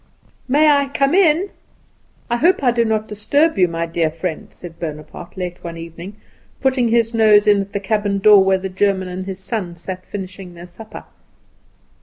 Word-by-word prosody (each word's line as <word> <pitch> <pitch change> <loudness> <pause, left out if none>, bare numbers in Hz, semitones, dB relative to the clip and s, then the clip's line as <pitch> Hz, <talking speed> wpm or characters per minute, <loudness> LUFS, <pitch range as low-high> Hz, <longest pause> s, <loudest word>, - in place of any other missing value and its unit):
"May 295 +4 +4
I 285 -2 +4
come 275 +1 0
in? 365 0 +3 0.8
I 240 - 0
hope 335 +3 +2
I 250 - +4
do 235 0 +1
not 220 -1 -1
disturb 255 +10 +1
you, 180 - +5
my 165 0 -3
dear 165 -1 -1
friend," 165 +1 -5
said 170 -2 -12
Bonaparte, 155 +3 -8
late 180 -1 -6
one 170 -1 -7
evening, 170 +4 -9 0.4
putting 260 -2 +1
his 230 0 +1
nose 215 -2 +5
in 205 -1 +4
at 195 0 -7
the 200 - -2
cabin 205 0 -1
door, 200 0 +6
where 190 0 +2
the 190 +1 -5
German 190 0 0
and 185 +1 -6
his 190 -1 -5
son 190 -3 -4
sat 185 +2 -8
finishing 190 -2 -8
their 170 +1 -10
supper. 195 +5 -11
200 Hz, 185 wpm, -19 LUFS, 180-235 Hz, 0.8 s, door